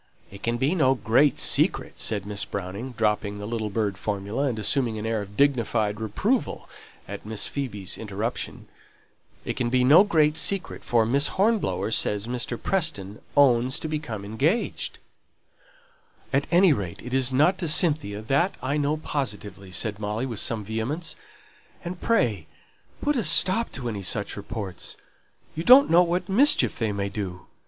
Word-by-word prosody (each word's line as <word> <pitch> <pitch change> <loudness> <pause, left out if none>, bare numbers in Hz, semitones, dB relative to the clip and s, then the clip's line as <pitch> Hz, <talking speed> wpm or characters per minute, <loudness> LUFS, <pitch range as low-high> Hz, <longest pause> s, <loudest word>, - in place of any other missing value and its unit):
"It 100 0 -11
can 115 +2 -1
be 135 +7 +1
no 135 -7 +3
great 120 +5 +3
secret," - - +1
said 105 -3 0
Miss 105 -1 -2
Browning, 100 +6 -6
dropping 105 -2 0
the 105 - -6
little 110 -1 -3
bird 100 -2 -2
formula, 105 +6 -2
and 120 -4 -2
assuming 115 +1 0
an 105 - -5
air 110 -1 -1
of 100 0 -10
dignified 115 -6 +1
reproval 200 - -1 0.4
at 100 0 -7
Miss 110 0 -2
Phoebe's 105 -9 -4
interruption, 110 +2 -4 0.8
"for 150 - +3
Miss 140 +5 +2
Hornblower 185 - 0
says 105 -2 +1
Mr. 120 0 -4
Preston 155 - -1 0.2
owns 130 -2 +4
to - - -5
being 155 0 -3
engaged 115 - -2 0.7
" - - -31
"At 140 +1 +1
any 175 -1 +5
rate 95 -9 -5
it 125 - -7
isn't 135 +8 +2
to 175 - -2
Cynthia, 150 - +1
that 140 - +1
I 135 +4 -1
know 150 +1 0
positively," 105 -10 -4
said 105 +3 -3
Molly 105 +4 -2
with 115 -5 -3
some 110 -3 -1
vehemence. 120 - -3 0.7
"And 175 +1 -6
pray 115 - +1 0.6
put 295 0 +1
a 235 - 0
stop 185 +7 +3
to 125 -2 -5
any 105 -4 -4
such 100 +2 -1
reports; 100 -2 -6 0.6
you 160 - -4
don't 255 +4 +7
know 170 +2 +7
what 175 +1 0
mischief 255 +10 +4
they 110 -3 0
may 100 0 -2
do. 95 -3 -6
120 Hz, 150 wpm, -25 LUFS, 105-155 Hz, 0.8 s, don't